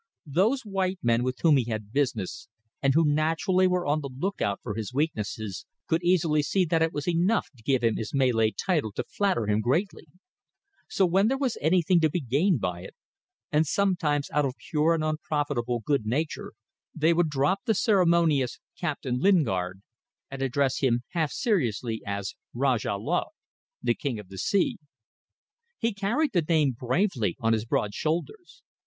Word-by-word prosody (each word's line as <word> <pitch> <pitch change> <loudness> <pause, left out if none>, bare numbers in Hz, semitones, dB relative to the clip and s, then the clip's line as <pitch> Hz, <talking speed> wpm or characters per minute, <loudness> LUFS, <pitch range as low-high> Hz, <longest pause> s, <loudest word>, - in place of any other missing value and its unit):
Those 195 - +1
white 195 -3 -1
men 115 0 +3
with 130 +1 -2
whom 155 -4 +6
he 125 - +1
had 110 -2 -5
business, 115 -11 -1 0.3
and 135 0 +2
who 165 0 +4
naturally 165 +5 +2
were 180 -1 0
on 150 +2 +1
the 140 - -5
look 180 +11 -4
out 100 -1 0
for 110 - -4
his 105 -1 -5
weaknesses, 110 - -3 0.2
could 165 +1 0
easily 170 -4 +2
see 185 +5 +1
that 165 0 +1
it 165 0 +2
was 145 0 -5
enough 175 +2 +1
to 120 - -19
give 130 +1 +1
him 115 -1 +2
his 110 - -4
Malay 125 -5 +2
title 150 - -1
to - - -2
flatter 195 - 0
him 105 +1 +1
greatly. 165 - -1 0.8
So 195 - +2
when 190 +4 +3
there 265 +3 +1
was 265 -4 -1
anything 175 +2 +3
to 160 -1 +3
be 175 - -1
gained 145 - +1
by 90 -3 -3
it, 95 - -11 0.6
and 155 +1 +2
sometimes 165 -7 0
out 150 - +2
of 130 -2 -2 0.2
pure 160 +2 +3
and 155 - -2
unprofitable 145 -6 -1
good 140 -6 +1
nature, 145 +7 -2 0.4
they 160 +1 +3
would 170 -1 +2
drop 150 +7 +1
the 220 -3 +2
ceremonious 170 - +2 0.2
"Captain 140 -7 -2
Lingard" 100 - +1 0.5
and 135 0 -6
address 135 0 +1
him 120 -3 +1
half 160 -4 -1
seriously 120 - -1
as 100 -1 -3 0.2
Rajah 125 -5 +1
Laut 155 - -2 0.5
the - - +3
King 140 -7 -3
of 105 -3 -10
the 95 -1 -8
Sea. 200 - +1 1.0
He 230 -1 0
carried 235 +10 0
the 175 - +3
name 155 -3 +2
bravely 125 - 0
on 115 0 +2
his 110 0 -1
broad 105 -2 -1
shoulders. 175 - -4
150 Hz, 175 wpm, -27 LUFS, 120-175 Hz, 1.0 s, whom